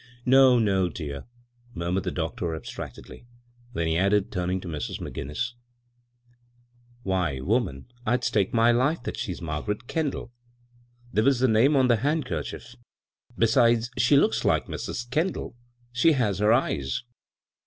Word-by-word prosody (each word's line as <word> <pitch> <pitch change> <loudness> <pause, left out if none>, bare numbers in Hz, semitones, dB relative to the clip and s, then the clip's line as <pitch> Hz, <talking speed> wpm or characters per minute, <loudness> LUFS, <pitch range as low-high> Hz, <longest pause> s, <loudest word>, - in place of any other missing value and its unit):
"No, 130 0 +6
no, 95 -5 +2
dear," 75 -2 -6 0.5
murmured 90 +2 -2
the - - 0
doctor, 80 0 -3
abstractedly; 100 +8 -9 0.5
then 85 - -1
he 80 +1 +1
added, 100 +1 +2
turning 90 0 -1
to 90 - -8
Mrs. 75 -3 -4
McGinnis; 75 - -4 0.8
" 120 0 -34
Why, 90 -9 -1
woman, 90 - -1 0.2
I'd 125 +1 0
stake 100 -5 +1
my 115 0 +4
life 130 +4 +1
that - - -4
she's 90 -2 -5
Margaret 85 +9 -3
Kendall. 145 -4 -3 0.8
There 110 - +3
was 135 +1 +4
the 130 - +3
name 120 +6 +4
on 130 -2 +4
the 120 -2 +4
handkerchief; 135 -2 -3 0.6
be 115 - +4
sides, 115 +1 +3
she 125 +4 +4
looks 110 -5 +2
like - - +2
Mrs. 120 - -5
Kendall. 155 -1 -2 0.4
She 155 +7 +4
has 105 -9 0
her 105 +1 +4
eyes." 115 - 0
115 Hz, 145 wpm, -26 LUFS, 90-125 Hz, 0.8 s, No